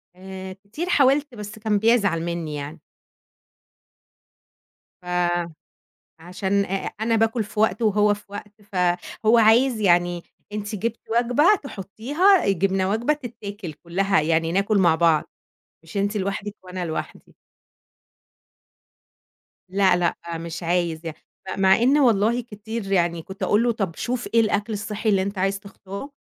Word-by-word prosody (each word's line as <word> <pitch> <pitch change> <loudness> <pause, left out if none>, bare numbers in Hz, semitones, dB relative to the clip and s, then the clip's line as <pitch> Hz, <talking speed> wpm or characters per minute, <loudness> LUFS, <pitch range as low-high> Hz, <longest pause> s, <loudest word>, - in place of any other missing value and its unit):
آآ 190 0 -8
كتير 205 - -7
حاولت 280 -3 +3
بس 210 0 -8
كان 215 -1 +1
بيزعل 205 -6 +2
منّي 170 -3 -3
يعني. 145 +3 -6 2.2
ف - - -21 1.2
عشان 190 +3 -1
آآ 195 0 -3
أنا 225 +1 +1
باكُل 225 0 +1
في 210 0 -5
وقت 220 +2 +2
وهو 210 -1 +3
في 205 - -14
وقت، 205 +1 -10
فهو 185 +5 +1
عايز 230 +2 +4
"يعني 175 -2 +2 0.3
أنتِ 210 +1 -4
جبتِ 230 +3 -3
وجبة 245 - +4
تحُطّيها، 275 - +1
جِبنا 195 0 +1
وجبة 230 +7 +1
تتاكل 220 - -7
كُلّها، 195 +5 0
يعني 165 +1 +1
ناكُل 200 +3 +2
مع 170 -4 +4
بعض، 160 -2 +3 0.6
مش 165 +5 -8
أنتِ 200 +2 0
لوحدك 200 +1 -3
وأنا 180 -1 -5
لوحدي." 160 -1 -6 2.4
لأ، 190 -1 +3
لأ، 175 -1 0 0.2
مش 165 +1 -6
عايز 170 -1 -1
يع 165 - -4 0.4
م - - -2
مع 190 0 +6
إن 265 +5 +4
والله 235 -2 +3
كتير 220 -2 -7
يعني 170 -3 +1
كنت 190 +4 -8
أقول 210 +3 +3
له: 240 - +2
"طَب 195 -7 -3
شوف 245 0 -3
إيه 230 - +6
الأكل 215 0 0
الصحّي 215 +1 -3
اللي 195 -2 +3
أنت 200 +1 -4
عايز 195 +1 0
تختاره 200 +5 -9
200 Hz, 140 wpm, -23 LUFS, 180-225 Hz, 2.4 s, مع